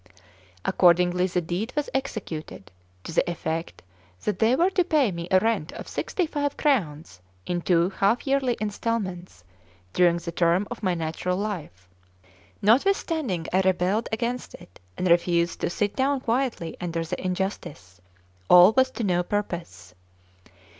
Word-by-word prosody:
Accordingly 180 0 +3
the 180 -1 -1
deed 180 +8 -3
was 295 -1 -1
executed, 200 - -5 0.3
to - - -7
the 175 - +2
effect 165 -1 -4 0.4
that 210 - -2
they 230 +3 +4
were 350 +7 +2
to 370 -1 +2
pay 300 - +2
me 170 -1 -5
a 190 - +5
rent 220 -6 -1
of - - -8
sixty 365 - -2
five 290 -2 -2
crowns, 155 - -1 0.2
in 175 -1 -2
two 175 +1 +2
half 200 +5 +1
yearly 270 -3 +1
installments, 200 - -3 0.5
during 175 -1 +4
the 170 0 -6
term 170 +4 +2
of 240 - -6
my 185 -4 0
natural 165 +3 -2
life. 170 - -5 0.8
Notwithstanding 260 - +2
I 190 - +4
rebelled 190 +3 +1
against 235 +3 -3
it, 90 - -16 0.2
and 185 - -1
refused 170 0 +2
to - - 0
sit 205 +3 -1
down 270 0 +1
quietly 240 -8 -1
under 165 -1 -2
the 180 +3 -5
injustice, 180 - -4 0.5
all 180 +4 +8
was 260 0 +4
to 235 - -4
no 180 -3 +2
purpose. 175 - -4
185 Hz, 145 wpm, -25 LUFS, 170-235 Hz, 0.8 s, all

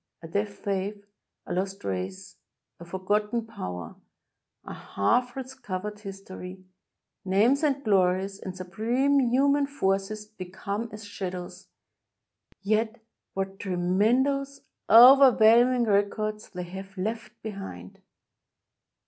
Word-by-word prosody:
A - - -7
dead 200 +5 -1
faith 200 0 -4 0.2
— - - -58
a - - -4
lost 190 +2 -3
race 95 0 -5 0.2
— - - -58
a 170 - -10
forgotten 210 +5 -1
power 90 - -7 0.4
— - - -45
a - - -7
half 245 - 0
recovered 210 -6 -6
his 195 -2 -9
tory 185 0 -9 0.3
— - - -58 0.2
names 215 +9 +3
and 280 -3 0
glories 195 -1 +1
and 185 -1 -7
supreme 235 +10 +1
human 280 +3 +3
forces 210 -5 -1
become 205 +2 -6
as 210 0 -9
shadows 185 -2 -6 0.5
— - - -39
yet 220 +1 0 0.4
what 195 0 -3
tremendous, 240 +10 +1 0.3
overwhelm 245 -1 +8
ing 250 -1 +1
records 210 0 0
they 180 -1 -6
have 190 +2 -9
left 220 +5 -4
behind! 195 - -8
205 Hz, 125 wpm, -27 LUFS, 185-235 Hz, 0.5 s, overwhelm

